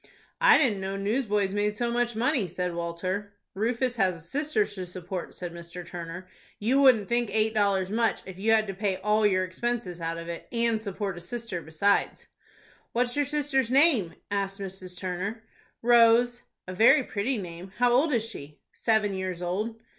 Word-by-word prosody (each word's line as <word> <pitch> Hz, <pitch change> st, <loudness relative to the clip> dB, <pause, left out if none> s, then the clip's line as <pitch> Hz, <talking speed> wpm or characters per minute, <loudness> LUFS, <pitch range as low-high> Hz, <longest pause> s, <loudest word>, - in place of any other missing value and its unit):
"I -, -, +7 dB
didn't 225 Hz, -10 st, +2 dB
know 195 Hz, +1 st, -3 dB
newsboys 205 Hz, -2 st, 0 dB
made 205 Hz, 0 st, 0 dB
so 235 Hz, +1 st, -1 dB
much 240 Hz, -1 st, 0 dB
money," 225 Hz, -2 st, +1 dB
said 180 Hz, +1 st, -3 dB
Walter. 185 Hz, +4 st, -3 dB, 0.2 s
"Rufus 240 Hz, +4 st, -1 dB
has 185 Hz, -4 st, +2 dB
a -, -, -14 dB
sister 300 Hz, -, 0 dB
to 185 Hz, -3 st, -7 dB
support," 180 Hz, 0 st, -6 dB
said 175 Hz, -2 st, -5 dB
Mr. 170 Hz, +1 st, -8 dB
Turner. 175 Hz, +1 st, -7 dB, 0.3 s
"You 255 Hz, +7 st, +2 dB
wouldn't 240 Hz, -7 st, +5 dB
think 240 Hz, -1 st, 0 dB
eight 220 Hz, 0 st, +1 dB
dollars 200 Hz, -3 st, +1 dB
much, 225 Hz, +1 st, +1 dB
if 190 Hz, -1 st, -9 dB
you 220 Hz, +3 st, +2 dB
had 220 Hz, -1 st, +4 dB
to 195 Hz, -, -5 dB
pay 195 Hz, -1 st, -1 dB
all 210 Hz, +2 st, +2 dB
your 185 Hz, -2 st, +2 dB
expenses 185 Hz, -1 st, -3 dB
out 165 Hz, 0 st, -2 dB
of 165 Hz, 0 st, -7 dB
it, 170 Hz, -1 st, -6 dB
and 230 Hz, -2 st, +1 dB
support 200 Hz, -2 st, -4 dB
a -, -, -12 dB
sister 230 Hz, -2 st, -5 dB
besides." 165 Hz, +6 st, 0 dB, 0.7 s
"What 245 Hz, +1 st, +1 dB
is -, -, -5 dB
your 290 Hz, 0 st, +2 dB
sister's 280 Hz, -3 st, 0 dB
name?" 265 Hz, -, +4 dB, 0.2 s
asked 195 Hz, 0 st, -1 dB
Mrs. 185 Hz, -2 st, -5 dB
Turner. 190 Hz, +5 st, -4 dB, 0.4 s
"Rose." 240 Hz, +1 st, +5 dB, 0.3 s
"A 185 Hz, -, -5 dB
very 245 Hz, +8 st, +6 dB
pretty 230 Hz, +4 st, -2 dB
name. 180 Hz, -1 st, -8 dB
How 245 Hz, 0 st, +3 dB
old 275 Hz, +6 st, +3 dB
is 230 Hz, -4 st, +1 dB
she?" 145 Hz, -9 st, -9 dB
"Seven 220 Hz, -3 st, +1 dB
years 185 Hz, -2 st, -4 dB
old." 210 Hz, +6 st, -2 dB
205 Hz, 185 wpm, -27 LUFS, 185-235 Hz, 0.7 s, I